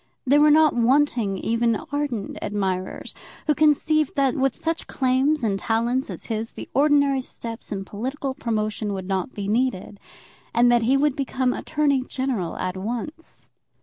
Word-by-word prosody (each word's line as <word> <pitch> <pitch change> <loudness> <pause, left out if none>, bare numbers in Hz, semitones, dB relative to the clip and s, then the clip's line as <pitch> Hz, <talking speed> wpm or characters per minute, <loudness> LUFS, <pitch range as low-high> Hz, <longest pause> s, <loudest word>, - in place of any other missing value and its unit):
There 285 +3 +5
were 300 - +6
not 310 0 +5
wanting 240 -4 +2
even 230 +3 +1 0.2
ardent 285 -8 -3
admirers 190 -2 -3 0.3
who 300 - +3
conceived 305 0 +2
that, 275 -3 +2
with 270 -1 0
such 330 0 -3
claims 265 +2 +1
and 200 -3 0
such - - -12
talents 235 +3 +1
as - - -7
his, 225 0 -4
the - - -8
ordinary 285 -1 +3
steps 230 -2 -8
in 195 -1 -4
political 260 +7 -4
promotion 215 -4 -2
would 190 -1 -5
not 190 +5 -2
be 200 -1 -5
needed, 210 -3 -1 0.6
and 240 +1 +5
that 240 -1 +4
he 255 +4 +3
would 290 -1 +2
become 260 -2 0
Attorney 295 -3 0
General 255 -9 -3
at 185 0 -3
once. 240 +11 -6
250 Hz, 160 wpm, -23 LUFS, 215-280 Hz, 0.6 s, were